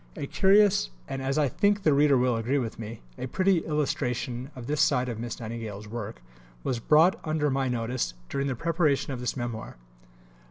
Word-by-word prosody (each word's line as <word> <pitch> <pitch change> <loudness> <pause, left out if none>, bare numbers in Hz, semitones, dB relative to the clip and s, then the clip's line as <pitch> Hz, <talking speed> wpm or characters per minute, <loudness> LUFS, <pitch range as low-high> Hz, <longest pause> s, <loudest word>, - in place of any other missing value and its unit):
A - - -4
curious 195 - +4 0.2
and, 135 - -4
as 135 +2 -1
I 150 -2 +3
think 205 - +1
the 155 - +4
reader 140 -1 +5
will 125 -1 +2
agree 115 +5 0
with 115 -5 -3
me, 110 0 -7 0.2
a - - -3
pretty 185 +6 +2
illustration 130 -5 -2
of 125 -2 -8
this 150 +2 0
side 125 -5 +3
of 115 -3 -4
Miss 120 0 -5
Nightingale's 110 -3 -6
work, 105 - -6 0.4
was 125 -3 -1
brought 155 +9 +4
under 155 -2 0
my 135 0 0
notice 120 - -2
during 140 - -2
the 130 - -1
preparation 155 -2 +1
of 125 - -5
this 125 +1 -3
Memoir. 120 - -5
130 Hz, 190 wpm, -27 LUFS, 115-150 Hz, 0.4 s, reader